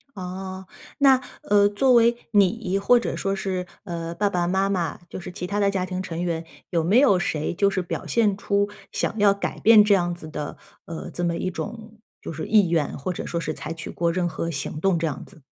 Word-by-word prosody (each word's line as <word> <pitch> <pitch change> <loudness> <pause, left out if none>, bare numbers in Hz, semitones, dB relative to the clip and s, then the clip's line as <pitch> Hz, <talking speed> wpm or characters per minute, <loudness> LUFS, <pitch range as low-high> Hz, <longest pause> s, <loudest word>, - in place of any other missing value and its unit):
哦， 185 0 -6 0.3
那， 270 -2 +6 0.2
呃， 205 0 +4
作 255 +5 +3
为 235 0 +5 0.2
你 195 -1 +2
或 240 +5 +5
者 - - -3
说 195 0 -1
是， 185 -2 -3 0.2
呃， 170 -2 -5
爸 205 +3 +1
爸 175 -3 0
妈 190 +2 +1
妈， 180 -4 -1
就 - - -7
是 180 - -7
其 180 0 -5
他 205 +2 -1
的 200 0 +3
家 185 -2 -1
庭 185 0 -3
成 170 -2 -5
员， 170 -2 -2 0.3
有 170 -3 +1
没 195 +9 +4
有 230 -10 +5
谁 155 -1 -2
就 200 +2 +3
是 190 - -1
表 175 - -5
现 210 -4 +2
出 200 0 0 0.2
想 220 - -2
要 205 -1 +5
改 200 - -4
变 215 -2 +7
这 210 - +5
样 175 -2 +1
子 160 -2 -10
的 150 -1 -5 0.3
呃， 165 -1 -6
这 175 - -5
么 170 -1 0
一 185 - -2
种 220 +3 -7 0.2
就 - - -6
是 155 - -5
意 205 -6 +4
愿， 160 -4 0
或 180 +7 -3
者 - - -5
说 170 - -3
是 155 -1 -3
采 150 - -6
取 165 -1 -7
过 170 -1 0
任 175 0 0
何 165 0 -3
行 150 0 -4
动 190 -2 +2
这 165 - -1
样 145 - -4
子？ 160 -7 -17
185 Hz, 245 characters per minute, -24 LUFS, 170-205 Hz, 0.3 s, 变